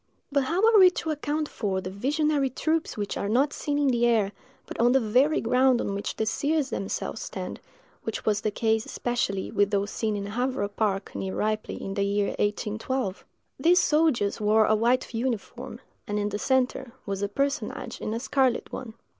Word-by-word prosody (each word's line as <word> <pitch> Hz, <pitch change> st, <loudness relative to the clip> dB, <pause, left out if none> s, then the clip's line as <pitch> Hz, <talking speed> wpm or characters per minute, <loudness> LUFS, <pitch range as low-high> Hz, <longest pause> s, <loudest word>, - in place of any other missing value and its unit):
But 280 Hz, -1 st, +2 dB
how 345 Hz, +8 st, 0 dB
are 450 Hz, -2 st, +6 dB
we 370 Hz, -1 st, +9 dB
to 335 Hz, -3 st, -3 dB
account 300 Hz, 0 st, -2 dB
for 195 Hz, -8 st, -2 dB
the 185 Hz, 0 st, -5 dB
visionary 285 Hz, +6 st, +1 dB
troops 315 Hz, +4 st, -1 dB
which 205 Hz, -1 st, -3 dB
are 200 Hz, -, -2 dB
not 270 Hz, +6 st, +2 dB
seen 290 Hz, -1 st, -2 dB
in 290 Hz, -2 st, +3 dB
the 240 Hz, -1 st, +3 dB
air, 215 Hz, -4 st, +2 dB, 0.3 s
but -, -, -8 dB
on 240 Hz, +2 st, +4 dB
the 270 Hz, -, +5 dB
very 255 Hz, +7 st, +3 dB
ground 250 Hz, +1 st, +3 dB
on 200 Hz, -, -2 dB
which 200 Hz, +1 st, -3 dB
the 220 Hz, -, -1 dB
seers 285 Hz, +5 st, 0 dB
themselves 195 Hz, -, -3 dB
stand, -, -, -6 dB, 0.4 s
which 225 Hz, -, -5 dB
was 210 Hz, -1 st, +2 dB
the 215 Hz, -, 0 dB
case 220 Hz, +1 st, +1 dB
especially 240 Hz, -6 st, -2 dB
with 205 Hz, 0 st, +2 dB
those 200 Hz, 0 st, 0 dB
seen 215 Hz, -2 st, -1 dB
in 200 Hz, -1 st, -3 dB
Havarah 245 Hz, 0 st, -1 dB
park, 200 Hz, -2 st, -1 dB
near 190 Hz, 0 st, -4 dB
Ripley, 215 Hz, 0 st, -1 dB
in 195 Hz, -, -5 dB
the 200 Hz, -, -1 dB
year 200 Hz, 0 st, +1 dB
1812? 210 Hz, +1 st, -2 dB, 0.4 s
These 350 Hz, +2 st, +5 dB
soldiers 300 Hz, -13 st, +2 dB
wore 215 Hz, +1 st, +4 dB
a 215 Hz, -, +3 dB
white 240 Hz, +4 st, +1 dB
uniform, 235 Hz, 0 st, -3 dB, 0.3 s
and 205 Hz, -, -1 dB
in 205 Hz, 0 st, 0 dB
the 205 Hz, 0 st, -3 dB
centre 260 Hz, -1 st, 0 dB
was 195 Hz, -1 st, -3 dB
a 200 Hz, -, -1 dB
personage 275 Hz, 0 st, -2 dB
in -, -, -3 dB
a -, -, -2 dB
scarlet 260 Hz, -1 st, +1 dB
one. 225 Hz, -4 st, -6 dB
230 Hz, 195 wpm, -26 LUFS, 205-275 Hz, 0.4 s, we